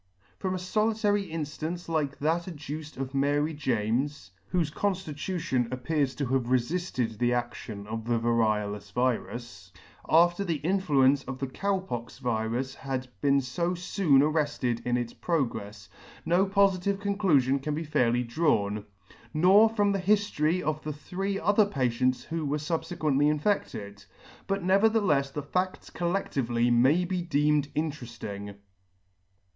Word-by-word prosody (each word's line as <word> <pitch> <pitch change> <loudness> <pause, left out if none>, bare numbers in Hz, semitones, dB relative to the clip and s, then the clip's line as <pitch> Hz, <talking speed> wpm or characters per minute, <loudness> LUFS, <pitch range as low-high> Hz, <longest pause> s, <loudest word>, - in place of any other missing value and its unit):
From 185 -1 -1
a - - -2
folitary 205 0 0
inflance 160 +2 -4
like 150 -4 -1
that 165 +4 0
adduced 150 -2 -7
of 135 0 -4
Mary 145 +3 +1
James, 125 -4 -1 0.2
whofe 165 -5 0
conflitution 175 - -1
appears 135 +1 -1
to 140 - -2
have 125 -1 0
refilled 125 - -1
the 120 - +2
adlion 120 -4 -4
of 110 +1 -5
the 120 0 +1
variolous 110 -3 0
virus, 120 -5 -2 0.4
after 175 +4 +4
the 170 -4 -1
influence 145 -5 +2
of 135 0 -5
the 135 - -2
Cow 195 +9 -1
pox 120 -11 -6
virus 120 +1 -2
had 130 -2 -4
been 140 -1 +4
fo 170 +8 -2
foon 175 -5 +3
arrefted 145 -6 0
in 120 0 +2
its 120 -1 -3
progrefs, 105 - -2 0.4
no 175 +4 +3
pofitive 195 -1 +2
conclufion 180 -10 +2
can 150 +1 -2
be 160 - -3
fairly 125 -6 +1
drawn; 110 -6 0 0.5
nor 195 +7 +6
from 205 -2 +1
the 195 - 0
hiflory 185 -4 +1
of 155 +1 -1
the 150 - -4
three 195 +6 -3
other 205 +3 +3
patients 130 - 0
who 165 -1 -4
were 145 0 0
fubfequently 155 -2 0
infedted; 145 - -2 0.4
but 195 -1 -1
neverthelefs 190 -7 +3
the 150 +1 -4
fadts 185 +5 -2
col 175 0 -1
ledtively 120 -10 0
may 135 +9 +4
be 180 0 -2
deemed 150 -3 +1
interefling. 115 -9 -4
150 Hz, 140 wpm, -28 LUFS, 125-180 Hz, 0.5 s, nor